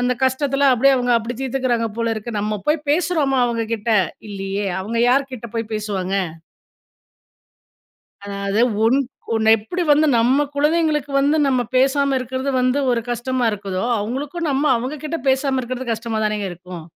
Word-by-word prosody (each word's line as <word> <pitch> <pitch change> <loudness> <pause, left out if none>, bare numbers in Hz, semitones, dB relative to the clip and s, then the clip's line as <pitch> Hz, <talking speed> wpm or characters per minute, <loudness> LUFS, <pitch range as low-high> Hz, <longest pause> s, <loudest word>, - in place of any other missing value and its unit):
அந்த 245 0 +2
கஷ்டத்துல 275 +1 +2
அப்பிடியே 270 +3 +4
அவுங்க 245 -1 +1
அப்பிடி 230 +2 -3
தீர்த்துக்கிறாங்க 250 -3 0
போல 230 -1 0
இருக்கு. 220 +2 -6
நம்ம 210 -1 -2
போய் 300 -1 +1
பேசுறோமா! 300 -4 +1
அவங்கக்கிட்ட 230 -1 -2 0.4
இல்லீயே! 195 0 -3
அவுங்க 225 +4 -3
யார்க்கிட்டப்போய் 235 -4 -2
பேசுவாங்க. 195 -3 -2 2.1
அதாவது, 200 +1 -2 0.2
உன் 255 +5 +4 0.4
ஒன்ன 220 0 +4
எப்படி 350 - -4
வந்து 300 +2 +5
நம்ம 260 +5 +3
குழந்தைகளுக்கு 300 -1 +1
வந்து, 290 +3 +2
நம்ம 255 -2 +2 0.2
பேசாம 275 +1 +3
இருக்கிறது 260 +2 -3
வந்து 255 +2 +2
ஒரு 240 -1 +1
கஷ்டமா 245 +1 -1
இருக்குதோ! 195 -1 -3
அவுங்களுக்கும், 285 +10 -3
நம்ம 275 +1 0
அவங்க 260 +6 -4
கிட்ட 320 +2 -3
பேசாம 265 0 +2
இருக்கிறது, 255 0 -4
கஷ்டமா 225 0 -3
தானேங்க 210 -2 -1
இருக்கும். 175 -1 -9
250 Hz, 140 wpm, -20 LUFS, 220-275 Hz, 2.1 s, வந்து